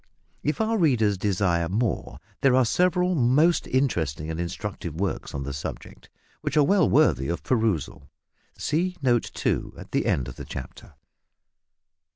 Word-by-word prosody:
If 150 - -1
our 220 0 +1
readers 115 - +3
desire 90 -3 0
more 110 +3 -1 0.2
there 135 -2 +4
are 130 -1 +4
several 180 - +2
most 150 +4 +3
interesting 80 - 0
and 80 - -5
instructive 85 -2 -5
works 95 -3 -3
on 70 - -3
the 70 0 -5
subject, 70 - -7 0.3
which 150 - -2
are 150 - +6
well 195 +6 +3
worthy 70 - +3
of 85 - -3
perusal. 110 - -1 0.5
See 180 +4 -1
note 120 -3 +2
2 - - -1
at - - -11
the - - 0
end 65 - +1
of - - -9
the - - -7
chapter. 65 - -9
115 Hz, 155 wpm, -25 LUFS, -, 0.5 s, are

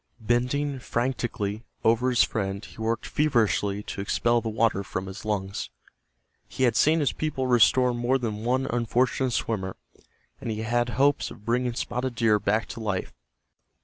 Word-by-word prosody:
Bending 125 +5 0
frantically 120 -4 -2 0.2
over 115 +3 +3
his 120 -2 +4
friend 100 -1 -2
he - - -14
worked 115 +1 -1
feverishly 105 -8 +1
to 100 - -5
expel 120 +4 +1
the 115 - -3
water 110 -2 +1
from 95 0 -4
his 95 +2 -8
lungs. 100 -2 -2 0.8
He 130 - -3
had 120 -3 +3
seen 160 +5 +4
his 135 -9 +1
people 150 -2 -2
restore 125 +1 +4
more 120 +2 +1
than 110 -4 -4
one 130 +3 +1
unfortunate 125 +2 +1
swimmer, 95 -6 -2 0.6
and - - -5
he 110 0 -2
had 120 +2 +1
hopes 140 +2 +3
of 105 - -13
bringing 120 0 0
Spotted 125 +1 -2
Deer 110 -2 +3
back 110 +2 +1
to - - -7
life. 105 -4 -3
115 Hz, 160 wpm, -26 LUFS, 105-125 Hz, 0.8 s, his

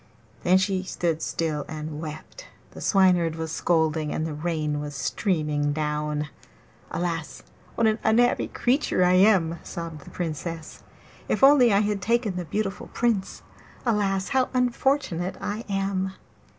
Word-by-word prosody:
Then 185 +1 +4
she 190 0 +1
stood 170 -3 -2
still 155 -3 -2
and 155 -1 -6
wept; 155 - -8 0.2
the - - -10
Swineherd 180 -5 +3
was 160 -1 -4
scolding, 160 -2 +1
and 155 - -1
the 160 - -3
rain 150 -1 -2
was 145 -1 -6
streaming 150 - 0
down. 150 0 -2 0.6
'Alas, 165 -2 -3 0.3
what 230 - +2
an 220 0 +2
unhappy 240 +3 +3
creature 250 -7 +1
I 180 0 +4
am!' 185 -4 +4
sobbed 165 -4 -7
the - - -12
Princess. 165 -1 -5 0.5
'If - - 0
only 270 -4 +7
I 200 0 +4
had 205 -2 -1
taken 230 -1 +1
the 180 -1 -3
beautiful 195 +4 -3
Prince! 230 -5 0 0.4
Alas, 200 -4 +1
how 260 -1 +2
unfortunate 250 - 0
I 215 +3 -4
am! 195 -1 -1
180 Hz, 140 wpm, -25 LUFS, 155-210 Hz, 0.6 s, only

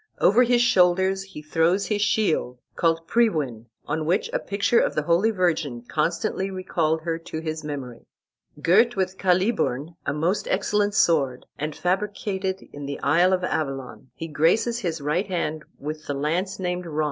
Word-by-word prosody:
Over 220 +6 +5
his 245 -1 +4
shoulders 190 -2 +3
he 190 -6 -10
throws 165 +5 +2
his 205 0 -1
shield 200 - +1 0.2
called 165 -1 +1
Priwen, 150 - +1 0.2
on 155 +1 -2
which 180 +5 +1
a - - +1
picture 200 +4 +1
of - - 0
the 150 - 0
Holy 170 +7 +3
Virgin 165 - 0
constantly 180 +5 -1
recalled 170 -4 -1
her 165 0 -2
to 160 -1 -6
his 155 -1 -4
memory. 135 -5 -7 0.5
Girt 215 +10 +4
with 190 -1 -2
Caliburn, 180 - +1
a - - -1
most 165 +8 -1
excellent 205 +1 +1
sword, 140 -10 +2
and 150 +1 -3
fabricated 190 0 -2
in 145 -1 -7
the 140 - -5
isle 175 +5 +4
of 185 -1 +1
Avalon, 135 -6 -3
he 165 - -6
graces 170 +11 +2
his 165 -7 -3
right 160 +8 0
hand 160 -4 -2
with 155 +1 -6
the 145 - -2
lance 170 +7 -1
named 180 -1 -3
Ron. 155 -1 -4
170 Hz, 165 wpm, -24 LUFS, 150-195 Hz, 0.5 s, Over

